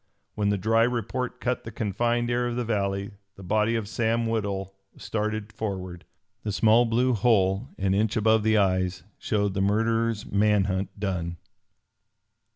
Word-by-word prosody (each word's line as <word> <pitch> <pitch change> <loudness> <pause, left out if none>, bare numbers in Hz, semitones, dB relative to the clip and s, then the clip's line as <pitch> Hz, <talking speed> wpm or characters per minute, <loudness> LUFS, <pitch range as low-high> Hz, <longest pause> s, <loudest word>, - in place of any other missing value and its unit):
When 105 -1 0
the 100 - +1
dry 115 +4 +2
report 125 +2 -1
cut 125 0 -1
the - - -7
confined 120 +3 -1
air 120 0 +1
of 120 - -3
the 125 -1 -2
valley, 100 -2 -1 0.2
the 95 - -12
body 110 +4 +1
of 110 -3 -2
Sam 115 +1 0
Woodhull 100 -4 -2 0.2
started 110 0 -3
forward. 95 -5 -5 0.4
The 105 - -3
small 110 +4 +4
blue 125 +3 +2
hole 105 0 +2
an 95 -1 +1
inch 105 +2 +1
above 110 0 +3
the 110 +1 +3
eyes 95 -2 +1 0.2
showed 100 -2 0
the 95 - -1
murderer's 115 +2 +1
man 105 0 +2
hunt 95 +1 -3
done. 90 -4 -2
105 Hz, 160 wpm, -26 LUFS, 100-115 Hz, 0.4 s, small